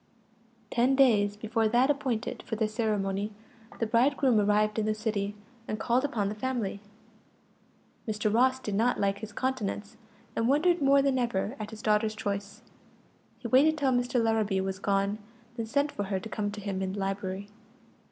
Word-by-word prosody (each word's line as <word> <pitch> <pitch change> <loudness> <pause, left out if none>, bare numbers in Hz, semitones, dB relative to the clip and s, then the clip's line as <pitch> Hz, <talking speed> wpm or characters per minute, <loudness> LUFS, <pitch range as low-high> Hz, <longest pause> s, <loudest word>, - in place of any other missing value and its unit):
Ten 250 +2 +3
days 210 -7 +4
before 220 +1 0
that 245 +5 +4
appointed 255 -5 -2
for 225 - -4
the 220 0 +1
ceremony, 210 -2 -1 0.5
the 230 - 0
bridegroom 250 +1 +3
arrived 210 +1 +2
in 215 - 0
the 215 - +1
city, 210 -2 -2 0.3
and 215 - -3
called 250 +2 +1
upon 230 -8 -1
the 205 - -2
family. 220 -3 -3 1.3
Mr. 215 -1 0
Ross 260 +3 +4
did 210 -5 -4
not 230 +5 +2
like 200 0 0
his 215 0 -7
countenance, 220 -3 -3 0.4
and 230 - +1
wondered 335 +6 +3
more 275 0 +5
than 270 -2 +2
ever 235 -1 -1
at 210 - -5
his 220 -1 -10
daughter's 215 0 +2
choice. 205 +1 -4 0.7
He 235 - -6
waited 290 +7 +4
till 275 -3 +2
Mr. 245 0 +1
Larrabee 220 -4 +1
was 190 0 -3
gone, 200 +1 0 0.4
then 230 -2 -4
sent 285 +4 +1
for 205 - -3
her 190 -1 -1
to 185 - -8
come 210 -1 -2
to 205 +1 -7
him 195 -1 -3
in 190 0 -2
the 200 - -5
library. 195 0 -3
215 Hz, 175 wpm, -29 LUFS, 205-245 Hz, 1.3 s, more